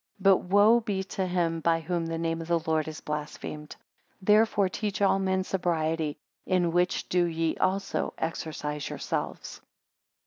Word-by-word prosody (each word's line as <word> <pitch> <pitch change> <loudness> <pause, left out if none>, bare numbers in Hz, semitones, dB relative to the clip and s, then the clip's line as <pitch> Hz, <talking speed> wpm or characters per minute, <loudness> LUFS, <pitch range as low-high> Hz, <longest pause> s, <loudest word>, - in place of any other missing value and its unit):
But 195 -1 +6
woe 205 +5 +5
be 205 -4 -2
to 190 -1 -1
him 170 -2 0
by 165 0 +2
whom 165 0 -2
the 165 0 -3
name 165 0 -1
of 165 - -7
the 170 0 +3
Lord 160 -1 +1
is 155 -1 -7
blasphemed. 150 0 -5 0.4
13 - - -40
Therefore 210 0 +4
teach 205 +2 -3
all 195 -1 +3
men 190 -1 +1
sobriety; 165 -5 -1 0.3
in 180 -2 +2
which 180 +2 +1
do 180 -1 +2
ye 165 -1 -1
also 195 +1 -1
exercise 150 -3 -3
yourselves. - - -4
175 Hz, 160 wpm, -28 LUFS, 160-190 Hz, 0.4 s, But